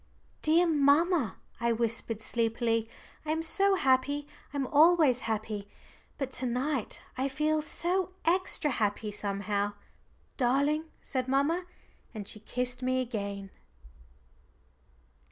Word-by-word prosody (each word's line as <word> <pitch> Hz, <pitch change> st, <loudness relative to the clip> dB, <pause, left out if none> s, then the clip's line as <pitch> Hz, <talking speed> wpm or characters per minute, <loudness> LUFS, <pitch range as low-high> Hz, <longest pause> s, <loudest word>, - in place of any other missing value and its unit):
"Dear 330 Hz, +3 st, +4 dB
mamma," 300 Hz, -, +3 dB, 0.2 s
I 235 Hz, 0 st, +1 dB
whispered 230 Hz, -1 st, -1 dB
sleepily, 230 Hz, 0 st, 0 dB, 0.3 s
"I 305 Hz, -, -7 dB
am 320 Hz, +1 st, 0 dB
so 390 Hz, +4 st, +4 dB
happy 285 Hz, -1 st, +2 dB, 0.2 s
I'm 280 Hz, -2 st, -1 dB
always 305 Hz, -2 st, +5 dB
happy, 215 Hz, -2 st, -3 dB, 0.5 s
but 270 Hz, -2 st, -3 dB
to 255 Hz, -, 0 dB
night 255 Hz, 0 st, -2 dB, 0.2 s
I 265 Hz, -, +1 dB
feel 305 Hz, +3 st, +1 dB
so 360 Hz, +4 st, 0 dB
extra 340 Hz, -3 st, +2 dB
happy, 210 Hz, -2 st, -1 dB
somehow." 205 Hz, 0 st, -2 dB, 0.6 s
"Darling," 280 Hz, +5 st, +2 dB, 0.2 s
said 260 Hz, -2 st, -2 dB
mamma. 295 Hz, +7 st, +1 dB, 0.5 s
And 205 Hz, -2 st, -6 dB
she 215 Hz, -, -6 dB
kissed 250 Hz, +3 st, -3 dB
me 255 Hz, 0 st, +1 dB
again. 200 Hz, -5 st, -4 dB
260 Hz, 115 wpm, -30 LUFS, 225-310 Hz, 0.6 s, always